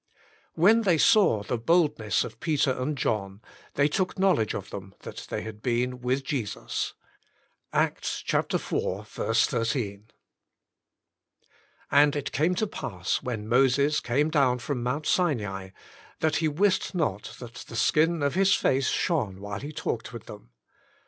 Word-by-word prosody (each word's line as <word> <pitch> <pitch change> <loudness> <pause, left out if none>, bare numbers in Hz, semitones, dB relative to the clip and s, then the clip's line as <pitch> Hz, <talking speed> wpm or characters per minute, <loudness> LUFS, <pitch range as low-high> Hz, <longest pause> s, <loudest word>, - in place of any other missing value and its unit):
"When 210 +8 +5
they 185 -7 +3
saw 155 - +4
the 120 - -2
boldness 145 - +2
of - - -9
Peter 150 -4 +1
and 130 +3 -2
John 100 -5 -2 0.4
they 140 +1 +4
took 185 +5 -1
knowledge 185 - +2
of 95 - -6
them, 95 0 -8
that - - -8
they - - -3
had 110 -1 -8
been 125 +1 -1
with 130 +2 0
Jesus." 125 -6 -3 0.4
— - - -41
Acts - - -1
iv. - - +2
13. 110 -3 -1 0.9
" - - -36
And 145 0 +5
it 140 -1 -3
came 165 +6 +1
to 215 - +1
pass 95 - -3
when 110 -4 -4
Moses 135 +5 +3
came 145 +6 0
down 135 -5 +3
from 125 +1 -3
Mount 135 +6 -2
Sinai, 105 - 0 0.5
that 155 -1 +1
he 160 - +1
wist 190 +5 +1
not 125 - -2
that 120 -2 -9
the - - -9
skin 160 +6 +2
of 140 - +1
his 195 +1 +4
face 135 0 +1
shone 110 - 0
while 100 +1 -5
he 145 +2 -6
talked - - -4
with - - -9
them. - - -11
135 Hz, 150 wpm, -27 LUFS, 110-155 Hz, 0.9 s, When